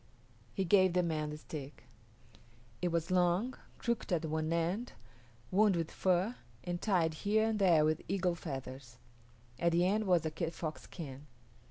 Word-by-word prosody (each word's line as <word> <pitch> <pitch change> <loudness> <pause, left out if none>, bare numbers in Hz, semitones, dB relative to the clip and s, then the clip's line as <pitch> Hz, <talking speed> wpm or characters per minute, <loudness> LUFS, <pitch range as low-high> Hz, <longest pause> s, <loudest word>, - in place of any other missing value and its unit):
He 195 - 0
gave 185 0 +5
the 180 0 +3
man 155 -3 -1
the 150 - -5
stick. 150 -2 -8 1.0
It 180 - +1
was 170 0 -1
long, 180 +7 +2 0.2
crooked 235 -4 -2
at 170 -2 +1
one 155 0 -1
end, 175 +8 -1 0.6
wound 205 0 +4
with 165 -2 -2
fur, 190 +6 +1 0.3
and 175 0 -3
tied 175 -6 +2
here 215 +6 +1
and 215 -1 -1
there 170 -6 +5
with 155 0 +1
eagle 185 -1 +1
feathers. 135 -6 -7 0.6
At 170 0 +2
the 175 +1 +4
end 210 +3 +1
was 175 -4 +3
a 160 - -1
kit 165 +1 -3
fox 155 -2 -4
skin. 145 -4 -9
170 Hz, 165 wpm, -33 LUFS, 155-190 Hz, 1.0 s, gave